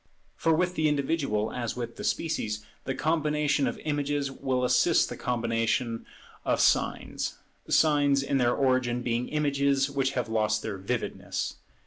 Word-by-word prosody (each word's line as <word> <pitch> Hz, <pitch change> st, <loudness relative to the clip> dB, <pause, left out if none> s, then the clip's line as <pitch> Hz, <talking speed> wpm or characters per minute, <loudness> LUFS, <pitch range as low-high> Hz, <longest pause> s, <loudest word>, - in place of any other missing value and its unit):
For 165 Hz, -, +1 dB
with 180 Hz, +3 st, +2 dB
the 155 Hz, -3 st, +2 dB
individual, 140 Hz, -7 st, 0 dB
as 120 Hz, -2 st, -3 dB
with 120 Hz, -1 st, -5 dB
the -, -, -6 dB
species, 105 Hz, -10 st, -1 dB, 0.2 s
the 135 Hz, -, -2 dB
combination 150 Hz, -2 st, +1 dB
of -, -, -3 dB
images 145 Hz, -2 st, -1 dB
will 130 Hz, -2 st, -1 dB
assist 125 Hz, +7 st, +3 dB
the -, -, -5 dB
combination 115 Hz, 0 st, -1 dB, 0.4 s
of -, -, +1 dB
signs: -, -, +1 dB, 0.3 s
signs 145 Hz, -3 st, +4 dB
in 140 Hz, 0 st, 0 dB
their 120 Hz, -1 st, +3 dB
origin 130 Hz, -2 st, +1 dB
being 120 Hz, 0 st, -1 dB
images 140 Hz, -2 st, +1 dB
which 135 Hz, -1 st, 0 dB
have 125 Hz, -3 st, -1 dB
lost 110 Hz, -1 st, +1 dB
their 100 Hz, -3 st, -4 dB
vividness. 110 Hz, +5 st, -3 dB
135 Hz, 145 wpm, -28 LUFS, 120-145 Hz, 0.4 s, signs